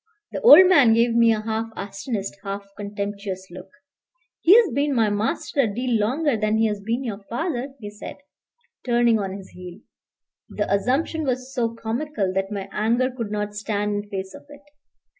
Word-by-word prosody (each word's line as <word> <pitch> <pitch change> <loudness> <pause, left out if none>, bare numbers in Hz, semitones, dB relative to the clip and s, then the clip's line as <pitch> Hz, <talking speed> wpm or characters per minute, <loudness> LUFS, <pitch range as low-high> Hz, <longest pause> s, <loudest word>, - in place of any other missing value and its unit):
The - - -5
old 415 -6 +9
man 280 -11 +6
gave 230 0 +3
me 230 0 +5
a 215 -1 0
half 220 +1 -3
astonished, 200 0 -5
half 200 0 -5
contemptuous 200 -2 -5
look. 185 +2 -10 0.7
"He's 420 +6 +6
been 280 +2 0
my 220 -3 +2
master 210 +7 -2
a 260 - +4
deal 240 +1 -1
longer 265 +6 +1
than 215 0 0
he's 215 -2 0
been 230 +6 -2
your 210 -5 -5
father," 270 0 -3
he 205 -2 -8
said, 210 - -9 0.7
turning 240 -2 +3
on 195 -1 -4
his 195 -1 -12
heel. 180 -1 -11 0.7
The 205 -1 -2
assumption 270 +10 0
was 255 -1 -3
so 230 -3 -1
comical 230 -3 -3
that 195 +1 -2
my 195 -2 -4
anger 235 +4 +1
could 235 -4 -5
not 210 0 -3
stand 210 0 -2
in - - -22
face 190 -1 -5
of - - -13
it. 290 0 -14
225 Hz, 175 wpm, -23 LUFS, 205-255 Hz, 0.7 s, old